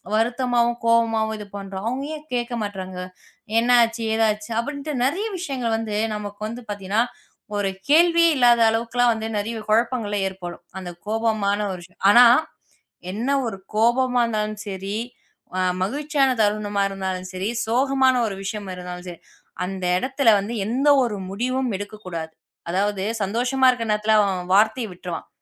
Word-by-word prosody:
வருத்தமாவும், 240 +1 +1
கோவமாவும் 225 -1 +2
இது 210 - -8
பண்ணுறோம். 195 0 -6
அவங்க 260 +3 -2
ஏன் 305 - -12
கேட்க 240 0 -2
மாட்றாங்க? 190 -3 -5 0.6
என்ன 235 +2 +2
ஆச்சு? 230 0 -1
ஏதா 225 0 +3
ஆச்சு 210 +2 -10
அப்பபிடின்டு 285 +4 -3
நெறய 345 +12 0
விஷயங்கள் 260 -9 -2
வந்து 220 -2 -3 0.2
நமக்கு 205 -1 -6
வந்து 235 +3 -6
பாத்தீங்கன்னா, 205 +2 0 0.5
ஒரு 205 -1 0 0.2
கேள்வியே 335 +2 +5
இல்லாத 240 -2 +5
அளவுக்குலாம் 235 +2 +2
வந்து 220 0 -4
நிறைய 225 +3 -3
குழப்பங்களே 225 -2 +1
ஏற்படும். 180 -2 -8 0.2
அந்தக் 175 -2 -8
கோபமான 215 -2 +1
ஒரு 180 - -7
சூ 185 - -29 0.2
ஆனா 240 +4 +9 0.9
என்ன 225 +7 -3 0.2
ஒரு 225 -4 -4 0.2
கோபமா 245 +3 +3
இருந்தாலும் 215 -2 -2
சரி, 195 +1 -4 0.6
அ - - +1 0.2
மகிழ்ச்சியான 280 +5 +1
தருணமா 205 -1 +1
இருந்தாலும் 190 -1 -4
சரி, 185 +3 -2 0.2
சோகமான 260 +2 +3
ஒரு 200 - -4
விஷயம் 205 0 -5
இருந்தாலும் 180 0 -8
சரி, 175 -2 -8 0.4
அந்த 190 0 -5
இடத்துல 260 +4 +2
வந்து 205 +4 -4
எந்த 255 +7 0 0.2
ஒரு 230 -4 -1
முடிவும் 250 +6 -1
எடுக்கக் 205 +1 -9
கூடாது. 165 -3 -5 0.4
அதாவது 195 +2 0 0.2
சந்தோஷமா 245 +6 +1
இருக்கிற 240 -3 0
நேரத்துல 210 +1 +2 0.4
வார்த்தைய 220 +4 +3
விட்டுருவான். 175 -2 -7
220 Hz, 145 wpm, -23 LUFS, 200-245 Hz, 0.9 s, ஆனா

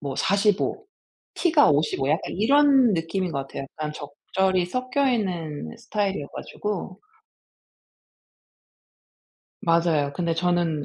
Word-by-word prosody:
뭐 140 -2 -4
45 205 - +1 0.5
T가 320 -5 +4
55 145 -2 +1
약간 155 +3 -1
이런 270 +3 +4
느낌인 170 +2 -2
것 140 - -2
같아요. - - -6
약간 150 +2 -6
적절히 180 +5 -1
섞여 255 +6 0
있는 175 -11 -3
스타일이어 200 -9 -2
가지고 200 -2 -5 2.6
맞아요. 165 -4 +2
근데 170 0 -1
저는 170 -3 0
180 Hz, 210 characters per minute, -24 LUFS, 155-215 Hz, 2.6 s, T가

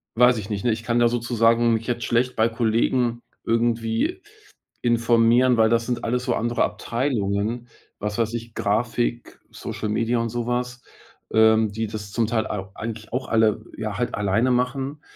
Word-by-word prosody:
weiß 125 +1 +5
ich 105 -1 -6
nicht, 105 0 -3
ne, 120 - +3
ich 110 +1 -3
kann 120 +1 +1
ja 120 - +5
sozusagen 115 0 +2
mich 110 0 -4
jetzt 120 -1 -2
schlecht 125 +2 +1
bei 110 +1 +3
Kollegen 120 +1 0 0.2
irgendwie 115 - 0 0.6
informieren, 120 +1 +3
weil 110 -1 +4
das 115 0 +2
sind 125 0 -3
alles 125 +2 -1
so - - 0
andere 120 +1 0
Abteilungen. 115 -2 -2 0.3
Was 105 0 -3
weiß 115 -1 0
ich? 115 -1 -6
Grafik, 120 +3 -1
Social 105 - -5
Media 115 +3 0
und 115 0 -1
sowas, 120 +1 -3 0.5
ähm, 110 -1 +4
die 110 +2 -2
das 105 -1 -7
zum 115 +2 +1
Teil 115 -1 0
au 95 -2 -5
eigentlich 110 0 -7
auch 130 +1 -2
alle, 110 -1 +2
ja 110 -3 -4
halt 120 - -1
alleine 105 +5 +1
machen. 135 +4 -1
115 Hz, 170 wpm, -23 LUFS, 110-120 Hz, 0.6 s, weiß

